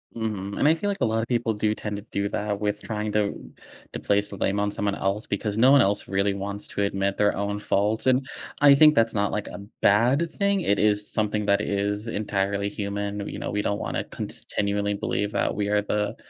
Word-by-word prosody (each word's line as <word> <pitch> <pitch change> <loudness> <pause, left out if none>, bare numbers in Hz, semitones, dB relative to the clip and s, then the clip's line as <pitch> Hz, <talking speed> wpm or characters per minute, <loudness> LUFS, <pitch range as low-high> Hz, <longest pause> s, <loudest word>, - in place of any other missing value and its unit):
Mhm, 105 -3 -4
and 145 - +3
I 155 - +6
feel 165 +5 -2
like 200 -1 -3
a - - +4
lot 110 0 0
of 115 - -4
people 120 -2 0
do 105 0 0
tend 105 -1 -5
to - - -6
do 100 0 -1
that 105 -1 -2
with 105 0 -2
trying 105 -1 -3
to 105 -1 +1 0.6
to - - -4
place 100 0 +1
the 100 - -8
blame 100 +2 0
on 105 0 0
someone 100 0 -1
else, 100 +2 -2
because 100 +1 -2
no 120 +4 +5
one 140 -1 +7
else 100 -2 0
really 100 +1 +1
wants 100 +1 -5
to - - -3
admit 100 0 0
their 105 0 +2
own 100 +1 -2
faults, 105 +3 0
and 130 +1 +3 0.4
I 145 -1 +8
think 150 +2 +6
that's 115 -2 +3
not, 100 -1 0
like, 105 - -3
a - - -8 0.2
bad 125 +11 +3
thing, 200 -1 +1
it 100 - +1
is 105 0 +1
something 105 -1 -1
that 100 0 +3
is 105 +1 -2
entirely 100 -2 -1
human, 100 0 -4
w 100 - -5
you - - -5
know, - - -4
we 105 - 0
don't 100 0 -1
wanna - - -2
continually 100 0 -3
believe 100 0 -2
that - - 0
we 105 -1 -1
are 105 0 +2
the 105 0 -2
105 Hz, 230 wpm, -25 LUFS, 100-110 Hz, 0.6 s, I